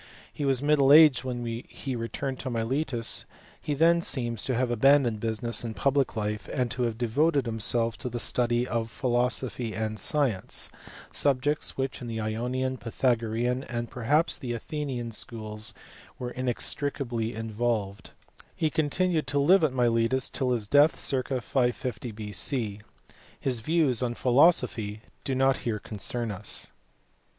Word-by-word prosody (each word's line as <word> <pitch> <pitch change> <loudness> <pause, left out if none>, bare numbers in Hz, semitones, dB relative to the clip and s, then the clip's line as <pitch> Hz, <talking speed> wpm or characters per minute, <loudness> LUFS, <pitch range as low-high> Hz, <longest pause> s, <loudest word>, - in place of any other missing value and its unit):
He 145 - -3
was 135 -1 +1
middle 145 -2 +4
aged 150 -4 +8
when 120 -2 -4
he 120 +3 -5
returned 130 +3 -4
to 130 - -4
Miletus; 120 +1 0 0.4
he 145 -2 -2
seems 170 +2 +4
then 120 -3 -2
to 130 +4 0
have 125 0 0
abandoned 120 -1 +4
business 115 +1 +1
and 115 -2 -5
public 140 -2 +1
life, 105 -1 -3
and 125 -4 -1
to 130 - -3
have 115 -2 -2
devoted 140 +4 +1
himself 115 0 0
to 125 - -4
the 120 0 -4
study 120 +1 0
of 115 -1 -2
philosophy 120 0 -1
and 110 -1 -3
science 135 -11 0 0.4
subjects 145 +2 +1
which 135 0 -3
in 120 - -6
the 115 -1 -4
Ionian, 125 +4 -2
Pythagorean, 120 +1 0
and 120 -1 -4
perhaps 145 +7 +1
also - - -24
the 125 -3 -3
Athenian 125 -2 -4
schools, 110 -2 -5 0.4
were 125 -1 -5
inextricably 125 -2 -2
involved: 110 -2 -2 0.5
he 155 -2 0
continued 160 0 0
to 140 +3 -1
live 175 +6 +5
at 155 - +3
Miletus 120 0 +2
till 130 -2 -1
his 120 -4 0
death 145 +7 +4
circ. 130 -3 +1
550 125 -2 -1
B.C. 105 +1 -1 0.6
His 130 -3 -1
views 145 -1 +2
on 120 -1 -1
philosophy 120 -6 +3 0.2
do 135 - -1
not 135 +1 +3
here 115 -3 -2
concern 115 +3 -4
us. 100 +1 -3
125 Hz, 145 wpm, -27 LUFS, 115-135 Hz, 0.6 s, aged